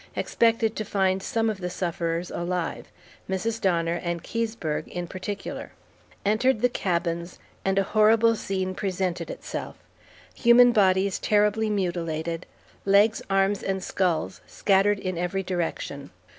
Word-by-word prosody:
Expected 230 Hz, -1 st, +1 dB
to 215 Hz, -, -1 dB
find 190 Hz, -2 st, +1 dB
some 225 Hz, +1 st, 0 dB
of 215 Hz, -3 st, -2 dB
the 180 Hz, -, -2 dB
sufferers 170 Hz, -1 st, -2 dB
alive. 175 Hz, -1 st, -3 dB, 0.4 s
Mrs. 220 Hz, +4 st, -2 dB
Donner 170 Hz, -3 st, +1 dB
and 170 Hz, -1 st, -3 dB
Keseberg 225 Hz, -9 st, -3 dB
in 175 Hz, 0 st, -5 dB
particular. 195 Hz, +3 st, -6 dB, 0.5 s
Entered 220 Hz, +3 st, +2 dB
the 245 Hz, -, +4 dB
cabins, 170 Hz, -4 st, -2 dB, 0.3 s
and 195 Hz, 0 st, +1 dB
a 195 Hz, -, +4 dB
horrible 220 Hz, +2 st, +4 dB
scene 190 Hz, -3 st, -2 dB
presented 185 Hz, -, -2 dB
itself. -, -, -6 dB, 0.6 s
Human 245 Hz, +1 st, +6 dB
bodies 195 Hz, -3 st, +3 dB
terribly 210 Hz, +1 st, +2 dB
mutilated, 170 Hz, -4 st, -2 dB, 0.4 s
legs, 205 Hz, +3 st, +4 dB
arms, 195 Hz, +1 st, +2 dB
and 190 Hz, -1 st, -2 dB
skulls 180 Hz, -2 st, -1 dB
scattered 200 Hz, +1 st, +2 dB
in 185 Hz, -3 st, -4 dB
every 180 Hz, +2 st, -1 dB
direction. 165 Hz, -6 st, -3 dB
195 Hz, 130 wpm, -26 LUFS, 175-215 Hz, 0.6 s, Human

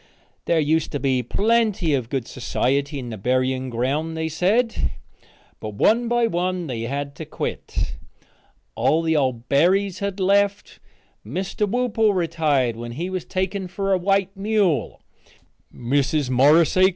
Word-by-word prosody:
There 170 Hz, -, +2 dB
used 160 Hz, +2 st, +1 dB
to 145 Hz, -, -1 dB
be 130 Hz, -2 st, +1 dB
plenty 205 Hz, -, +1 dB
of 125 Hz, -4 st, -1 dB
good 130 Hz, -3 st, -2 dB
society 140 Hz, +4 st, -1 dB
in 125 Hz, -3 st, -6 dB
the 110 Hz, -, -7 dB
burying 130 Hz, +3 st, 0 dB
ground, 140 Hz, +7 st, -2 dB
they 160 Hz, 0 st, -2 dB
said, 210 Hz, +9 st, +1 dB, 0.7 s
but 105 Hz, -1 st, -6 dB
one 230 Hz, -, +3 dB
by 240 Hz, 0 st, +2 dB
one 180 Hz, -3 st, -1 dB
they 125 Hz, -6 st, -4 dB
had 140 Hz, +3 st, -3 dB
to -, -, -5 dB
quit. -, -, -4 dB, 0.8 s
All 160 Hz, +2 st, +2 dB
the 160 Hz, -1 st, +1 dB
old 130 Hz, -5 st, 0 dB
Berrys 185 Hz, +7 st, +2 dB
had 200 Hz, -1 st, -3 dB
left. 200 Hz, +1 st, +1 dB, 0.4 s
Mr. 195 Hz, +2 st, -2 dB
Whoople 225 Hz, -3 st, +1 dB
retired 155 Hz, -8 st, +1 dB
when 120 Hz, +1 st, -7 dB
he 175 Hz, +8 st, -4 dB
was 185 Hz, -2 st, -3 dB
taken 190 Hz, 0 st, -2 dB
for 195 Hz, +2 st, -1 dB
a -, -, +4 dB
white 195 Hz, +1 st, +1 dB
mule. 195 Hz, -, 0 dB, 0.7 s
Mrs. 135 Hz, +2 st, 0 dB
Morris 145 Hz, +6 st, +5 dB
A. 185 Hz, +1 st, +6 dB
165 Hz, 150 wpm, -22 LUFS, 130-195 Hz, 0.8 s, A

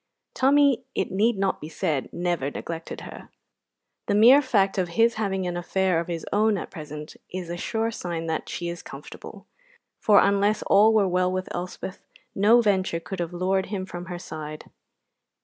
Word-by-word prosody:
Tommy, 280 Hz, 0 st, +4 dB
it -, -, -1 dB
need 210 Hz, +3 st, +2 dB
not 195 Hz, 0 st, 0 dB
be 155 Hz, -, -7 dB
said, 155 Hz, -4 st, -2 dB
never 175 Hz, -6 st, -1 dB
neglected 165 Hz, +2 st, -6 dB
her. -, -, -10 dB, 0.8 s
The -, -, +1 dB
mere 245 Hz, +7 st, +8 dB
fact 200 Hz, -8 st, +1 dB
of 180 Hz, -, 0 dB
his 230 Hz, +1 st, +5 dB
having 195 Hz, -4 st, -2 dB
an 175 Hz, -1 st, -2 dB
affair 180 Hz, 0 st, 0 dB
of 170 Hz, -, -4 dB
his 170 Hz, -2 st, -4 dB
own 215 Hz, 0 st, +3 dB
at -, -, -6 dB
present 150 Hz, -2 st, -8 dB, 0.2 s
is 180 Hz, -2 st, -5 dB
a -, -, -3 dB
sure 225 Hz, +5 st, -2 dB
sign 170 Hz, -6 st, -4 dB
that 160 Hz, -1 st, -3 dB
she 175 Hz, -, -4 dB
is 170 Hz, 0 st, -5 dB
comfortable, -, -, -11 dB, 0.5 s
for, 210 Hz, -2 st, +5 dB
unless 200 Hz, +1 st, +2 dB
all 210 Hz, +3 st, +5 dB
were 215 Hz, -3 st, +3 dB
well 180 Hz, 0 st, +1 dB
with 185 Hz, 0 st, -3 dB
Elspeth, 180 Hz, +2 st, -6 dB, 0.3 s
no 220 Hz, +5 st, +5 dB
venture 190 Hz, -6 st, +1 dB
could 190 Hz, +2 st, -7 dB
have 170 Hz, -1 st, -2 dB
lured 185 Hz, +2 st, 0 dB
him 190 Hz, -2 st, -4 dB
from 175 Hz, -1 st, -7 dB
her 175 Hz, 0 st, -5 dB
side. 155 Hz, -3 st, -8 dB
185 Hz, 180 wpm, -25 LUFS, 175-210 Hz, 0.8 s, mere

